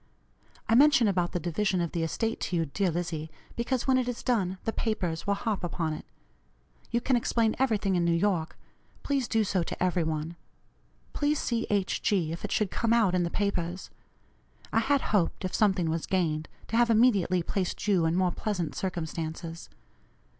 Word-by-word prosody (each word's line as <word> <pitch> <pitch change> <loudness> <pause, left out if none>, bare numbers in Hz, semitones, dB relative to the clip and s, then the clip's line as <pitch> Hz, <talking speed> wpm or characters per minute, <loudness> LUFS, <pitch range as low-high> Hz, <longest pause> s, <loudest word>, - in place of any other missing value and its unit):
I - - +2
mention 265 -2 +6
about 180 -3 +1
the 175 - -1
division 185 +3 0
of 170 -2 -1
the 170 - -2
estate 225 +8 -1
to 180 - -2
you, 165 -1 +1
dear 185 +6 0
Lizzie, 165 -2 -3 0.3
because 240 +1 -1
when 260 -1 +4
it 250 - -1
is 245 -1 -4
done 195 -7 0
the 225 - -1
papers 180 -8 -2
will 200 - +2
harp 205 -2 -2
upon 165 -2 -2
it. 155 - -7 0.8
You 235 - +1
can 255 +1 +2
explain 230 -1 +1
everything 215 -7 +1
in 175 - +2
New 170 0 +2
York; 170 -3 0 0.5
please 275 -4 0
do 225 -1 +2
so 195 -3 0
to 170 - -3
every 180 -1 +1
one. 160 +1 -3 0.8
Please 295 +1 +1
see 235 -4 -1
H. 200 -2 0
G., 180 -6 +1
if 165 - -6
it 210 - -4
should 210 -4 +1
come 230 -1 +1
out 220 -6 +3
in 180 - +2
the 170 - 0
papers. 185 -2 -2 0.8
I 225 - +4
had 275 +4 +2
hoped, 190 -1 +1
if 185 - -3
something 190 -5 +2
was 165 0 -2
gained, 155 -5 0 0.2
to 225 - 0
have 240 0 +4
immediately 205 -6 +3
placed 190 +3 -2
you 180 -5 +3
in 165 - +1
more 185 -1 +2
pleasant 180 -4 -2
circumstances. 165 -2 -4
190 Hz, 190 wpm, -28 LUFS, 170-225 Hz, 0.8 s, mention